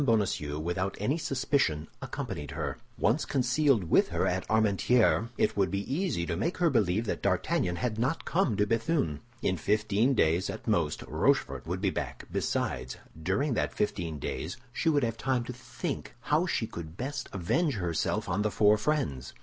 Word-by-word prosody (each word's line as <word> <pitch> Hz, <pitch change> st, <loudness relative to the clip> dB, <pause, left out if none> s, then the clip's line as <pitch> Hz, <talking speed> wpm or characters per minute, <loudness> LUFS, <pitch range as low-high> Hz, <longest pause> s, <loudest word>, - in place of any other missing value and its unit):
Bonacieux, 100 Hz, -, +1 dB
without 90 Hz, +5 st, -2 dB
any 135 Hz, +11 st, 0 dB
suspicion, 130 Hz, -, 0 dB
accompanied 75 Hz, -2 st, -5 dB
her. -, -, -4 dB, 0.2 s
Once 120 Hz, +8 st, +2 dB
concealed 130 Hz, -3 st, +2 dB
with 80 Hz, -, +4 dB
her -, -, 0 dB
at 90 Hz, +1 st, -1 dB
Armentières, 110 Hz, +2 st, +3 dB
it -, -, +2 dB
would 100 Hz, -2 st, +2 dB
be 100 Hz, +7 st, -2 dB
easy 165 Hz, -, 0 dB
to 85 Hz, -, -2 dB
make 170 Hz, -, -1 dB
her 170 Hz, -3 st, +3 dB
believe 110 Hz, -2 st, +2 dB
that -, -, -2 dB
D'Artagnan 90 Hz, -1 st, +1 dB
had 110 Hz, +1 st, -2 dB
not 130 Hz, +8 st, 0 dB
come 165 Hz, -, +1 dB
to 105 Hz, -, +3 dB
Béthune. 115 Hz, -, 0 dB, 0.2 s
In 95 Hz, -, +1 dB
fifteen 105 Hz, -, +2 dB
days 85 Hz, -1 st, +2 dB
at -, -, -6 dB
most, -, -, +1 dB
Rochefort -, -, +1 dB
would 90 Hz, +2 st, -2 dB
be 100 Hz, -2 st, +2 dB
back; -, -, -4 dB
besides, 60 Hz, -1 st, -1 dB, 0.2 s
during 100 Hz, -, +1 dB
that -, -, -1 dB
fifteen 85 Hz, -6 st, -1 dB
days 70 Hz, +4 st, -4 dB, 0.2 s
she 165 Hz, -, +1 dB
would 145 Hz, -3 st, +3 dB
have 115 Hz, -1 st, -1 dB
time 130 Hz, -1 st, 0 dB
to 125 Hz, -, -6 dB
think 125 Hz, +1 st, -5 dB
how -, -, +2 dB
she -, -, 0 dB
could 85 Hz, 0 st, -8 dB
best 135 Hz, +1 st, -4 dB
avenge 130 Hz, -, +1 dB
herself 85 Hz, -5 st, -1 dB
on 95 Hz, +4 st, 0 dB
the 105 Hz, -, +1 dB
four 105 Hz, 0 st, +4 dB
friends. 105 Hz, -, -1 dB
105 Hz, 175 wpm, -29 LUFS, 90-130 Hz, 0.2 s, with